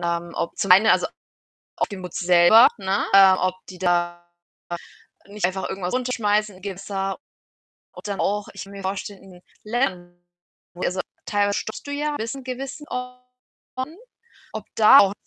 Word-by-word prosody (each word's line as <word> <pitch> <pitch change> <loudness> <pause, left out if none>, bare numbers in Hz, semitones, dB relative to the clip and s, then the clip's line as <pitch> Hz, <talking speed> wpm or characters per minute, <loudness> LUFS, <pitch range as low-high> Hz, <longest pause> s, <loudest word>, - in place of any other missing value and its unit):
haben, 170 0 -2
ob 170 - -3
zum 195 - +4
einen, 195 +4 +6
also, - - +4 0.7
auf - - 0
die 200 - -7
Muts 180 -2 -7
selber, 175 +6 +7
ne, 195 +1 0
ähm, 190 -1 +8
ob 185 0 +1
die 185 -1 -10
da 175 -1 0 1.0
nicht 205 -2 -2
einfach 190 +1 -2
irgendwas 185 0 -4
runterschmeißen 215 -5 0
im 185 - -17
Gewässer, 195 0 -4 0.7
ob - - -13
dann 200 -1 -3
auch 205 +1 -1
ich - - -8
mir 200 0 -10
vorstelle 195 +1 -5
in 185 -2 -15 0.2
Ländern, 180 -7 -3 0.5
wo 180 - -9
also, 185 +1 -1 0.2
teilweise 205 -1 +1
stoppst 220 - -7
du 285 - -5
ja 295 +1 -2
bis 225 +4 -3
in 270 - -9
gewissen 270 +3 -6
Orten, 250 +3 -8 0.6
ob - - -6
da 215 -1 +9
auch 195 -1 +4
195 Hz, 160 wpm, -23 LUFS, 185-230 Hz, 1.0 s, da